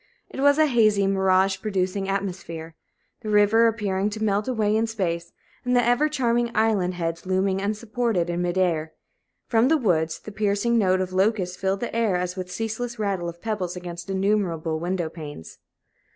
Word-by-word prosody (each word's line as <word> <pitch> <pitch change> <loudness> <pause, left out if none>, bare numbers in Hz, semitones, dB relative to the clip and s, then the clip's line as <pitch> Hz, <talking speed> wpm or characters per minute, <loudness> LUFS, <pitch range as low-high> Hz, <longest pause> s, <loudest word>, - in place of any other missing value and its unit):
It - - -7
was 285 +1 +4
a 310 - +5
hazy, 215 -7 +3
mirage 190 0 +2
producing 195 -1 -1
atmosphere, 175 -4 -4 0.5
the 215 - -5
river 210 +2 +5
appearing 205 -3 0
to 215 +1 -5
melt 205 +1 +1
away 215 -4 +1
in 225 +1 +1
space, 170 -6 -3 0.3
and 250 0 +1
the 245 - +4
ever 245 +6 +3
charming 240 -5 +1
island 210 -5 +2
heads 165 0 -4
looming 190 +1 +1
unsupported 215 -2 -1
in 175 0 -2
mid 175 +1 -1
air. 165 -4 0 0.5
From 230 +1 +3
the 320 +3 +4
woods, 165 - +1
the 215 - -10
piercing 210 +3 +1
note 185 -2 +2
of 185 0 -3
locusts 190 -2 +1
filled 195 +1 -1
the 240 - -4
air 225 -5 +2
as 180 0 -2
with 185 -1 -5
the 180 - -9
ceaseless 230 +2 -3
rattle 195 -5 -1
of 170 0 -12
pebbles 200 -5 -2
against 175 0 -7
innumerable 190 -5 0
window 175 0 -2
panes. 150 - -9
195 Hz, 180 wpm, -24 LUFS, 180-225 Hz, 0.5 s, a